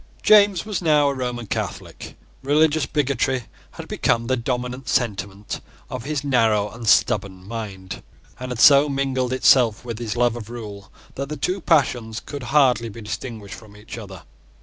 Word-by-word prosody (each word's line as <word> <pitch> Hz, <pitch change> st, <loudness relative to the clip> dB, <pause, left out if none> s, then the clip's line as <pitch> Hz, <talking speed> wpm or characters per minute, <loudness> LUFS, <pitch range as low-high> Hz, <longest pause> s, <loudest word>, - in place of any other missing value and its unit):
James 205 Hz, -4 st, +5 dB
was 210 Hz, -3 st, -3 dB
now 150 Hz, -4 st, +3 dB
a -, -, -1 dB
Roman 125 Hz, -3 st, -4 dB
Catholic. -, -, -6 dB, 0.2 s
Religious 150 Hz, +2 st, +2 dB
bigotry 135 Hz, -3 st, 0 dB, 0.3 s
had -, -, -9 dB
become 115 Hz, 0 st, 0 dB
the 130 Hz, +2 st, +1 dB
dominant 125 Hz, +1 st, -4 dB
sentiment 100 Hz, -3 st, -2 dB, 0.3 s
of 125 Hz, -1 st, -5 dB
his 150 Hz, -1 st, -2 dB
narrow 110 Hz, -6 st, +2 dB
and 115 Hz, 0 st, -8 dB
stubborn 100 Hz, -6 st, +2 dB
mind, 100 Hz, -4 st, -7 dB, 0.4 s
and 130 Hz, 0 st, -6 dB
had 125 Hz, -2 st, -5 dB
so 140 Hz, +2 st, +7 dB
mingled 135 Hz, -2 st, -1 dB
itself 125 Hz, -3 st, +3 dB
with 115 Hz, -2 st, -5 dB
his 115 Hz, -2 st, -4 dB
love 120 Hz, -1 st, +2 dB
of 115 Hz, -2 st, -8 dB
rule, 105 Hz, -5 st, -9 dB, 0.2 s
that 140 Hz, +1 st, -5 dB
the 150 Hz, -, -5 dB
two 185 Hz, +1 st, -2 dB
passions 125 Hz, -9 st, +1 dB
could 145 Hz, -1 st, -8 dB
hardly 125 Hz, -5 st, +3 dB
be 115 Hz, +2 st, -10 dB
distinguished 105 Hz, 0 st, -6 dB
from 105 Hz, -2 st, -13 dB
each 105 Hz, +2 st, -10 dB
other. 95 Hz, -7 st, -10 dB
120 Hz, 165 wpm, -22 LUFS, 110-140 Hz, 0.4 s, so